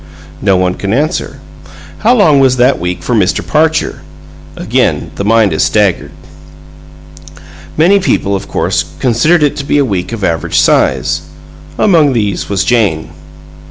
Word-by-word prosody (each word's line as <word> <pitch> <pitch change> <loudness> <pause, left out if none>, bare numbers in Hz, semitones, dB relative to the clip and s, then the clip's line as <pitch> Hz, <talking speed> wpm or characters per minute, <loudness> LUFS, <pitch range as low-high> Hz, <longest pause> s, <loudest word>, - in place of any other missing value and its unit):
No 95 -2 +2
one 90 0 0
can 100 +2 -4
answer. 155 +7 -2 0.6
How 235 +3 +3
long 160 - +4
was 130 -1 +2
that 125 +3 +2
week 90 +1 -4
for 125 - -2
Mr. 100 -5 0
Parcher? 160 +1 0 0.5
Again - - -1
the - - -5
mind 110 -3 +2
is 80 - -1
staggered. 80 -1 +1 1.7
Many 180 +6 +4
people, 100 - 0
of 95 - -6
course, - - -1 0.2
considered 150 +7 +2
it 145 - +1
to 140 - -4
be 140 - 0
a 140 - +2
week 95 -5 -3
of 115 -4 -6
average 85 -2 -1
size. 75 +1 +1 0.6
Among 160 -9 +3
these 105 -5 -2
was 100 -5 0
Jane. 100 -6 0
115 Hz, 150 wpm, -12 LUFS, 95-150 Hz, 1.7 s, long